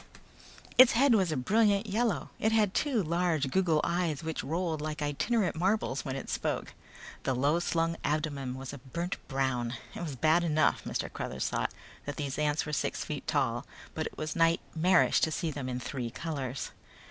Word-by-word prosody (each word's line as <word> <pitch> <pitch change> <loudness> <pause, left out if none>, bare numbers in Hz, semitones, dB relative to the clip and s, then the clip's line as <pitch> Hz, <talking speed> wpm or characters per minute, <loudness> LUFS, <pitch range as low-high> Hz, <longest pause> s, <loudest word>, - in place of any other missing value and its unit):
Its 255 -1 +9
head 270 +2 +5
was 190 -6 +3
a 155 - -1
brilliant 205 - +3
yellow. 210 - 0
It 220 - +2
had 215 -3 +3
two 260 -9 +1
large 165 -4 0
goggle 165 -4 +3
eyes 170 -4 0
which 160 -1 -3
rolled 165 -1 -1
like 155 0 -3
itinerant 170 +8 0
marbles 180 -5 0
when 135 -3 -3
it 135 - -5
spoke. - - -2 0.5
The 130 - 0
low 145 +6 +2
slung 165 -1 0
abdomen 145 -4 -1
was 135 +1 -7
a 140 - -7
burnt 170 +8 -4
brown. 130 -3 -1 0.2
It - - -6
was 155 -5 -4
bad 160 +6 +3
enough, 155 -2 +2 0.3
Cruthers 65 +1 -3
thought, - - -1 0.4
that 145 - -3
these 140 0 -3
ants 150 0 +1
were 150 - -5
six - - -1
feet - - -5
tall, - - +1 0.3
but - - -2
it - - -11
was 155 0 -3
nightmarish 165 +1 +3
to - - +3
see 160 0 -2
them 140 -3 -4
in 125 0 -2
three 125 -2 -4
colors. 140 -2 -4
155 Hz, 180 wpm, -30 LUFS, 140-180 Hz, 0.5 s, Its